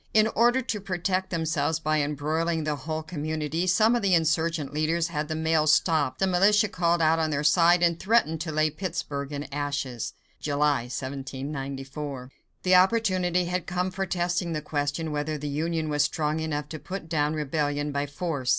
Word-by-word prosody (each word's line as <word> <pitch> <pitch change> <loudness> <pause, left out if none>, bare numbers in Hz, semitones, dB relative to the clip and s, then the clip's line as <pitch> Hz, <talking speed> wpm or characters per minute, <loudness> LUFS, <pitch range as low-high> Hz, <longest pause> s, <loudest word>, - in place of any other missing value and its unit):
In 215 0 +6
order 240 +3 +4
to 215 -4 -3
protect 185 0 -1
themselves 160 -2 0
by 155 -1 +1
embroiling 155 +3 -1
the 150 -1 -1
whole 155 +3 -4
community, 155 +1 -2
some 215 +6 +4
of 240 - 0
the 195 -2 +3
insurgent 160 -2 0
leaders 165 +3 0
had 150 -2 -2
the 155 - -3
mail 160 -1 +1
stopped, 155 -3 +3
the 190 - +2
militia 200 +3 +4
called 170 -4 +1
out 160 +1 +3
on 160 -1 +1
their 145 -1 -1
side, 170 +3 +5
and 170 -1 +2
threatened 190 -7 +2
to 160 -1 -3
lay 155 0 +2
Pittsburg 150 -4 -4
in 145 0 -4
ashes 145 -4 -3 0.3
(July, 145 -3 +1
1794). 135 +1 -5 0.3
The 185 - +3
opportunity 185 -2 +3
had 180 0 -2
come 180 +1 -1
for 195 +1 -3
testing 175 -1 -1
the 155 - -2
question 150 +2 -2
whether 150 +1 -2
the 150 0 -5
Union 160 +2 -1
was 145 -1 +2
strong 150 +1 -1
enough 150 -2 -3
to 155 - -6
put 185 +3 -6
down 155 -1 0
rebellion 145 0 -1
by 140 0 -1
force. 145 -3 -3
155 Hz, 180 wpm, -26 LUFS, 145-175 Hz, 0.3 s, In